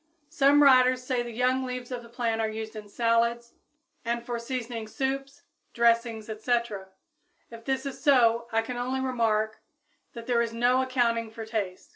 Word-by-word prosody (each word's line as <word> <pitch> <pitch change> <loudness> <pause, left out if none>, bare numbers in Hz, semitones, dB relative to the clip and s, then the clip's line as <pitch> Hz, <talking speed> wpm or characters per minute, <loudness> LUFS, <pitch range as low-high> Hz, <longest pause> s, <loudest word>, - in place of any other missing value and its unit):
_ 295 - -27
Some 290 -2 +5
writers 255 -2 +5
say 255 -1 -1
the 240 - -5
young 250 +3 +1
leaves 250 -1 -5
of 245 -1 -4
the 235 - -14
plant 230 -2 -1
are 220 - 0
used 220 0 -6
in 210 -1 -9
salads 235 +1 0 0.5
and 235 0 -2
for 240 -1 -3
seasoning 235 -2 -5
soups, 270 +3 -4 0.3
dressings, 230 -2 +2
etc. 220 -2 -2 0.6
If 230 0 -11
this 265 0 -1
is 275 - -6
so, 235 -4 +4
I 225 0 +1
can 245 +2 -5
only 255 +2 -2
remark 225 -4 0 0.5
that 235 -1 -8
there 240 -1 +2
is 230 -1 -2
no 245 +2 +3
accounting 235 -3 0
for 220 0 -8
tastes. 205 -5 -4
235 Hz, 175 wpm, -27 LUFS, 225-255 Hz, 0.6 s, Some